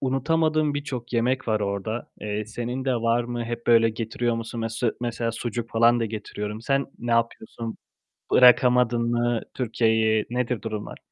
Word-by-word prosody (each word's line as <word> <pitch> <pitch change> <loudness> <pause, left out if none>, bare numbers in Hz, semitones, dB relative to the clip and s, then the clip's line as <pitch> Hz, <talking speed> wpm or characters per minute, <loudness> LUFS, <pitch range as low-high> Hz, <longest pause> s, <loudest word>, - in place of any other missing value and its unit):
unutamadığım 155 +3 +1
birçok 130 -5 -5
yemek 125 +2 0
var 110 -1 +1
orada. 100 +3 -3
Eee, 105 0 -3
senin 120 +4 -4
de 130 -1 +1
var 115 0 +1
mı? 120 0 -4
Hep 120 0 -5
böyle 115 -1 +5
getiriyor 115 +1 -2
musun? 115 0 -5
Mes 115 0 -4 0.2
mesela 120 -1 -2
sucuk 120 0 -4
falan 115 +1 +4
da - - +1
getiriyorum. 105 0 -5
Sen 135 +3 0
ne 120 0 -4
yapıyorsun? 115 -1 -1 0.6
Bırakamadın 125 -1 +5
mı 120 -1 +1
Türkiye'yi? 110 -3 +1
Nedir 125 -1 -1
durumlar? 110 -2 -5
120 Hz, 150 wpm, -25 LUFS, 115-125 Hz, 0.6 s, böyle